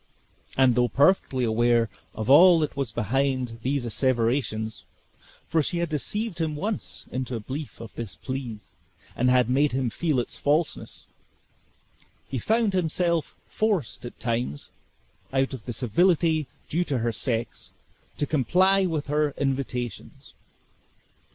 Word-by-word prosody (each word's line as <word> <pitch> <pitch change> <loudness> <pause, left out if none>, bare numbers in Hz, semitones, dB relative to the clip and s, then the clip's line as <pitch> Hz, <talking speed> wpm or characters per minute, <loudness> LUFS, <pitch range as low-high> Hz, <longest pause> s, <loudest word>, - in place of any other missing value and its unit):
And 130 -2 +5
though 125 +1 +3
perfectly 135 - +3
aware 120 0 +3 0.3
of 110 - -4
all 170 +6 +8
that 150 - -2
was 135 -5 -2
behind 125 +1 -1
these 135 +1 -1
asseverations 115 -2 0 0.6
(for 160 - +2
she 170 +4 -2
had 170 -1 -1
deceived 175 +5 -3
him 155 -2 -1
once 205 +7 -4
into 130 -1 -3
a - - -3
belief 135 +7 -6
of 115 -1 -9
this 115 -4 -6
please, 130 -5 -6 0.4
and 125 +1 +2
had 125 -2 +4
made 140 +2 +2
him 130 -3 0
feel 155 -3 0
its 120 - -4
falseness), 150 +3 -1 1.2
he 130 - -3
found 220 - +1
himself 170 -2 0
forced 205 - -1
at 120 - -9
times, 115 - -3 0.6
out 135 0 +1
of 125 -4 -8
the 125 - -4
civility 155 - +2 0.2
due 170 +3 0
to 140 -5 -1
her 115 0 0
sex, 115 0 -3 0.5
to 145 - 0
comply 185 +8 +3
with 155 -4 -2
her 150 0 0
invitations. 130 -3 -3
135 Hz, 140 wpm, -26 LUFS, 120-160 Hz, 1.2 s, all